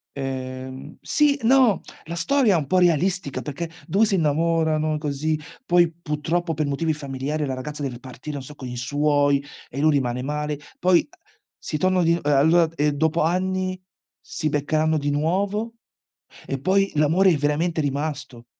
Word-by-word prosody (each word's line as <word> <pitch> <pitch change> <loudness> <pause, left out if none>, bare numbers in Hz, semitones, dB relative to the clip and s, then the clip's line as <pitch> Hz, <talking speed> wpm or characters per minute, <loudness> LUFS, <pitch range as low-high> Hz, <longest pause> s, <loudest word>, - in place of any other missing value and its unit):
Ehm, 130 -1 -6
sì 295 -1 +2
no, 245 -6 +5 0.3
la 170 +2 -5
storia 215 +5 +3
è - - +4
un 145 - -2
po' 185 +5 +3
realistica, 175 -2 +1
perché 160 +3 -5 0.2
2 205 +4 +3
si 205 - +1
innamorano 155 -1 +1
così, 150 +1 -2 0.3
poi 175 -4 +4
purtroppo 165 +1 -2
per 155 0 -1
motivi 145 +3 0
familiari, 145 +1 -3
la 135 - -2
ragazza 145 +3 -6
deve 130 -4 -4
partire, 130 +4 -8
non 140 - -5
so 150 - -10
con 130 - -8
i 125 - -6
suoi, 145 +2 +2 0.3
e 135 - -6
lui 155 +2 +4
rimane 125 -4 0
male; 150 +2 -3 0.2
poi, 180 -1 +5
uh, - - -23 0.4
si 155 - -4
tonno 185 +2 +2
di 165 - +3
uhm, 170 - 0
allora 160 +4 +4
e 150 -1 +2
dopo 160 +3 +1
anni, 185 +2 0 0.4
si 155 - -3
beccheranno 155 +2 +1
di 145 -1 -1
nuovo, 200 +9 -1 0.7
e 135 - -3
poi 195 +5 +2
l'amore 160 +6 +4
è - - +1
veramente 150 +3 0
rimasto. 140 -4 -3
155 Hz, 170 wpm, -23 LUFS, 145-175 Hz, 0.7 s, no